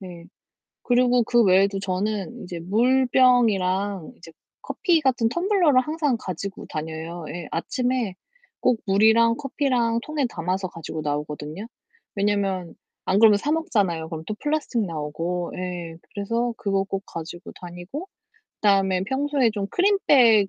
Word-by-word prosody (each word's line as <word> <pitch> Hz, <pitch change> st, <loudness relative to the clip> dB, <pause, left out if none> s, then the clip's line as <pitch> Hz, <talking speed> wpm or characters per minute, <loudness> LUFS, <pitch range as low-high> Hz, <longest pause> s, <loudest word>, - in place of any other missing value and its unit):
네. 175 Hz, -3 st, -10 dB, 0.6 s
그리고 245 Hz, 0 st, +3 dB
그 240 Hz, +1 st, +3 dB
외에도 195 Hz, +1 st, +4 dB
저는 200 Hz, +4 st, -3 dB
이제 175 Hz, -1 st, -6 dB
물병이랑 215 Hz, -4 st, +2 dB
이제 165 Hz, -1 st, -14 dB, 0.3 s
커피 345 Hz, -5 st, +1 dB
같은 250 Hz, -5 st, +2 dB
텀블러를 345 Hz, -, +3 dB
항상 300 Hz, -1 st, 0 dB
가지고 190 Hz, 0 st, -6 dB
다녀요. 160 Hz, +1 st, -5 dB
예, 175 Hz, -1 st, -6 dB
아침에 245 Hz, +3 st, -1 dB, 0.5 s
꼭 235 Hz, -3 st, +2 dB
물이랑 220 Hz, +4 st, +4 dB
커피랑 255 Hz, -4 st, 0 dB
통에 305 Hz, -3 st, -1 dB
담아서 185 Hz, 0 st, -2 dB
가지고 160 Hz, -2 st, -6 dB
나오거든요. 150 Hz, +5 st, -4 dB, 0.5 s
왜냐면 195 Hz, -3 st, 0 dB, 0.3 s
안 190 Hz, -, +2 dB
그러면 215 Hz, -1 st, +7 dB
사 285 Hz, -, -2 dB
먹잖아요. 200 Hz, -, 0 dB
그럼 160 Hz, -1 st, -6 dB
또 215 Hz, -, -2 dB
플라스틱 295 Hz, -6 st, -1 dB
나오고, 165 Hz, +2 st, -3 dB
예, 175 Hz, -2 st, -5 dB, 0.2 s
그래서 230 Hz, +4 st, -1 dB
그거 195 Hz, -2 st, 0 dB
꼭 195 Hz, 0 st, -4 dB
가지고 170 Hz, +2 st, -8 dB
다니고, 180 Hz, -, -7 dB, 0.5 s
그다음에 195 Hz, -3 st, +3 dB
평소에 265 Hz, +1 st, +1 dB
좀 205 Hz, -2 st, -3 dB
크린백 265 Hz, -, +4 dB
200 Hz, 305 characters per minute, -24 LUFS, 180-250 Hz, 0.6 s, 그러면